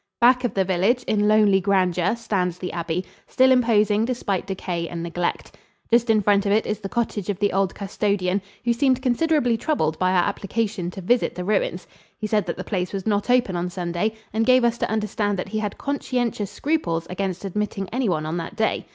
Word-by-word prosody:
Back 250 +1 +5
of 245 - -1
the 190 -1 +2
village, 195 +7 +1
in 210 -1 +1
lonely 210 -2 +4
grandeur, 185 0 +2
stands 185 -6 -1
the 180 - -5
abbey, 170 +1 -2 0.2
still 260 0 +4
imposing 220 -4 +3
despite 215 -6 -2
decay 180 -3 -3
and 170 -1 -5
neglect. 170 +1 -3 0.4
Just 235 0 +3
in 215 -2 +4
front 200 0 +3
of - - +1
it 215 +2 +3
is 210 -1 -2
the 195 -2 -6
cottage 215 -4 -2
of 200 - -1
the 205 +1 0
old 195 -1 +1
custodian, 200 -1 -1 0.2
who 240 - +3
seemed 260 +1 +1
considerably 255 -2 +2
troubled 190 - -1
by 185 - +2
our 180 -1 +3
application 200 -2 -2
to 190 - -8
visit 240 +7 +1
the 180 - -4
ruins. 195 -3 0 0.3
He 215 - -5
said 210 -1 0
that - - -3
the - - -4
place 185 -3 -3
was 195 -2 -4
not 205 +1 0
open 245 -7 +3
on 175 +1 -2
Sunday 175 +4 -2 0.2
and 220 +1 +1
gave 255 +1 +5
us 235 0 +1
to - - -1
understand 210 -1 -1
that 180 - -4
he 215 +1 -2
had 210 -2 -3
conscientious 245 -7 -2
scruples 275 - -1
against 190 0 -3
admitting 195 0 -3
anyone 190 -12 0
on 160 +2 -2
that 170 +5 -5
day. 220 0 -1
205 Hz, 205 wpm, -23 LUFS, 185-230 Hz, 0.4 s, Back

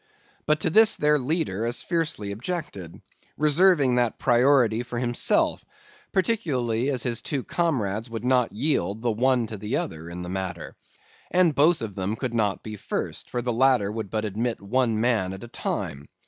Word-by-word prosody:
But 155 0 +2
to 160 - +1
this 220 +4 +7
their 150 0 +2
leader 130 - -1
as 120 - -3
fiercely 160 - -2
objected, 100 - -6 0.3
reserving 150 -2 +4
that 120 -2 +1
priority 120 -2 +3
for 125 -1 -6
himself; 120 0 +1 0.5
particularly 140 - 0
as 130 -5 -1
his 120 -2 -1
two 140 -4 -3
comrades 115 - -1
would 115 0 -5
not 125 -2 +2
yield, 110 -4 -1
the 120 - +2
one 125 +2 +2
to 110 -1 -7
the 105 +2 -2
other, 80 +1 -5
in 90 +1 -6
the - - -7
matter; 90 -2 -5 0.5
and 180 -3 +3
both 155 +1 +3
of 105 -3 -5
them 95 +3 -2
could 125 0 -4
not 105 -4 0
be 110 -1 -7
first, - - -4
for 120 -1 -3
the 120 -1 -1
ladder 125 -4 +3
would 110 -2 -5
but 110 +1 -2
admit 110 +3 -2
one 115 +2 0
man 110 -6 +1
at 95 - -9
a - - -8
time. 70 -10 -4
120 Hz, 175 wpm, -25 LUFS, 105-140 Hz, 0.5 s, this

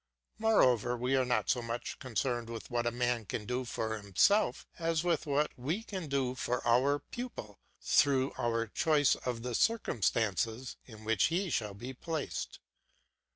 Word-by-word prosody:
Moreover, 125 - +3
we 125 +3 +1
are 130 - +3
not 125 -1 0
so 125 - +2
much 115 +1 -5
concerned 120 -2 -2
with 115 +2 -7
what 120 0 0
a - - +1
man 120 -1 0
can 105 +2 -4
do 125 +3 -2
for 110 -2 -2
himself, 105 - +2
as 165 -1 0
with 170 -3 0
what 145 +1 +1
we 155 - -2
can 190 -7 -5
do 135 -2 0
for 125 -1 -2
our 130 +5 +4
pupil 190 - -8 0.2
through 135 -2 +3
our 115 -2 0
choice 145 +5 +3
of 120 -2 -4
the 125 -1 -3
circumstances 115 - 0
in 110 -3 -12
which 110 -3 +3
he 175 +2 0
shall 105 -5 -1
be 125 +6 -7
placed. 155 +3 -4
125 Hz, 160 wpm, -32 LUFS, 115-145 Hz, 0.2 s, our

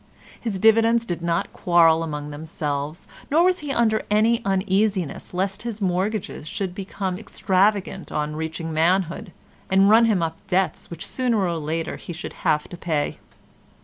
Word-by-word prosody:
His 220 -5 -2
dividends 225 +3 +4
did 175 -5 -4
not 170 0 -1
quarrel 165 -2 +4
among 150 -2 -4
themselves, 150 0 -4 0.2
nor 320 +4 +4
was 365 0 +3
he 295 -2 -4
under 220 -4 +2
any 225 +3 +3
uneasiness 195 -2 0
lest 195 +3 -2
his 230 -2 -5
mortgages 190 -3 -2
should 190 +2 -3
become 190 -1 -4
extravagant 195 -2 0
on 150 0 -2
reaching 160 +1 -4
manhood 175 +4 +1 0.4
and 195 +2 +5
run 230 +1 +7
him 205 -7 +2
up 165 0 -3
debts 185 -3 0
which 170 +1 -4
sooner 250 -3 0
or 175 -5 0
later 160 +2 -3
he 175 - -8
should 165 - -7
have 150 0 +1
to 175 - -8
pay. 155 -4 -2
185 Hz, 155 wpm, -23 LUFS, 165-215 Hz, 0.4 s, run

